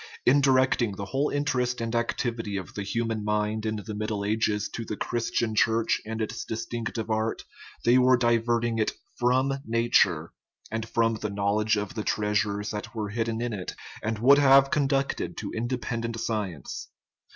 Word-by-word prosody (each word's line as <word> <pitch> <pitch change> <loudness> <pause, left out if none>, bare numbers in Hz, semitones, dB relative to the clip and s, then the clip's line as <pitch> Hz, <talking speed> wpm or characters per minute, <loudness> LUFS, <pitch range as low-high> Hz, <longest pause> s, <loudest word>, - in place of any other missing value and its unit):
In 140 +3 +5
directing 130 -5 +3
the 100 - -5
whole 135 +7 0
interest 125 -4 0
and 115 0 -3
activity 115 -3 -1
of 95 - -7
the 100 - -4
hu 115 +4 -1
man 110 -2 -2
mind 105 +1 0
in 110 - -1
the 105 +1 -6
Middle 105 -1 -2
Ages 105 -1 +1
to 115 - -5
the 105 -2 -5
Christian 115 -1 -1
Church 115 +1 +2
and 110 0 -4
its 110 - -4
distinctive 115 0 -4
art 110 +1 -1 0.4
they 120 +2 +6
were 130 0 +5
diverting 120 -1 +1
it 110 - +1 0.3
from 130 +3 +2
nature 105 - +2 0.4
and 110 0 -3
from 115 -1 +2
the 105 0 -3
knowledge 105 +2 +1
of 105 +4 -3
the 110 -3 -3
treasures 105 0 0
that 105 +2 -6
were 105 -2 -2
hid 115 +2 -1
den 115 0 -2
in 120 -2 -2
it, 95 -3 -5 0.3
and 110 0 -2
would 135 +6 +6
have 135 -1 +6
conducted 140 -1 0
to - - -4
independent 115 -1 -3
science. 105 -8 -3
115 Hz, 175 wpm, -27 LUFS, 105-120 Hz, 0.4 s, they